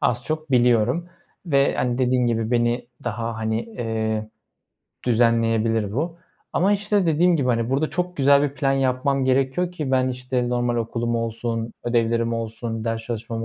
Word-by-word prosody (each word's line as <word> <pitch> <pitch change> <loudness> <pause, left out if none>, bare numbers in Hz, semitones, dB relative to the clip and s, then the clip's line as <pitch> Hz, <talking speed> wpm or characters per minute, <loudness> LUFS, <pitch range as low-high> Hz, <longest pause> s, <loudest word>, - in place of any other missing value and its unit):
az 120 0 0
çok 155 -1 -4
biliyorum 125 +5 +3 0.4
ve, 140 -3 +3
hani, 125 0 0
dediğim 125 -1 +2
gibi, 115 -1 0
beni 120 0 +1 0.2
daha, 115 -1 -3
hani, 110 +1 -1
eee, 110 -2 -3 0.8
düzenleyebilir 115 -3 +2
bu. 165 +8 -2 0.4
Ama, 195 +4 +3
işte, 205 -1 +1
dediğim 170 +2 +3
gibi, 130 -4 0
hani, 115 0 +1
burada 140 +4 +1
çok 180 0 -2
güzel 140 0 +5
bir 145 -1 -1
plan 135 -2 +1
yapmam 135 0 +1
gerekiyor 135 +7 +1
ki 150 -6 -4
ben, 130 -1 +2
işte, 125 -1 -2
normal 120 -1 0
okulum 115 0 -1
olsun, 115 0 -3
ödevlerim 115 -1 +1
olsun, 115 0 -4
ders 115 0 -2
çalışmam 115 0 -4
120 Hz, 155 wpm, -23 LUFS, 115-135 Hz, 0.8 s, güzel